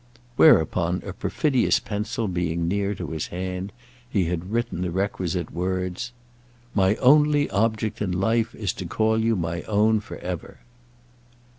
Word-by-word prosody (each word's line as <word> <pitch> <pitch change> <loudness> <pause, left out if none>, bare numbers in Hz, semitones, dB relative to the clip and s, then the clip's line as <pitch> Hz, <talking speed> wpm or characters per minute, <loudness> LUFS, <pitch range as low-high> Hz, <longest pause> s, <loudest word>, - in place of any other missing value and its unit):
Whereupon, 90 - +4
a 95 - -5
perfidious 130 +6 +1
pencil 105 +1 -3
being 85 -2 -1
near 100 +2 0
to - - -6
his 80 -1 -3
hand, 90 +2 -4 0.4
he 100 -6 +1
had 90 +3 -3
written 115 -6 -1
the 90 - -1
requisite 90 -2 -2
words. 90 +4 -2 0.6
"My 95 +1 +3
only 145 +3 +4
object 110 0 0
in 100 -3 0
life 110 +5 +1
is 100 -5 -2
to 90 - -4
call 110 +4 +1
you 115 0 +2
my 85 -2 -2
own 110 +1 +3
for 105 - -9
ever." 90 -3 -6
100 Hz, 145 wpm, -24 LUFS, 90-110 Hz, 0.6 s, Whereupon